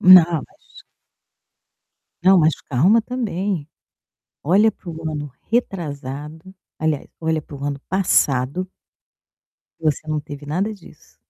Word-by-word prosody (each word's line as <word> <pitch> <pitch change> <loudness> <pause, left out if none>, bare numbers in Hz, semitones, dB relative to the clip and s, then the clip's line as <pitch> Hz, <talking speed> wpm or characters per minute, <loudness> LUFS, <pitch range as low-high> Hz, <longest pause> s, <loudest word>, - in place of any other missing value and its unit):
Não, 185 -2 +10 0.2
mas - - -19 1.4
Não, 190 0 +7
mas 160 0 +4 0.2
calma, 180 - +4
também. 200 - -2 0.8
Olha 200 +8 +5
para 185 -4 -10
o 160 -1 -4
ano 145 -2 -5 0.2
retrasado. 160 - -3 0.2
Aliás, 155 -2 -1
olha 160 -1 0
para 145 - -11
o 140 - -8
ano 140 -1 -2
passado 180 -2 +1 1.1
que - - -19
você 155 0 0
não 155 -1 0
teve 145 0 -9
nada 185 +9 -1
disso. 195 - -17
160 Hz, 120 wpm, -21 LUFS, 145-190 Hz, 1.4 s, Não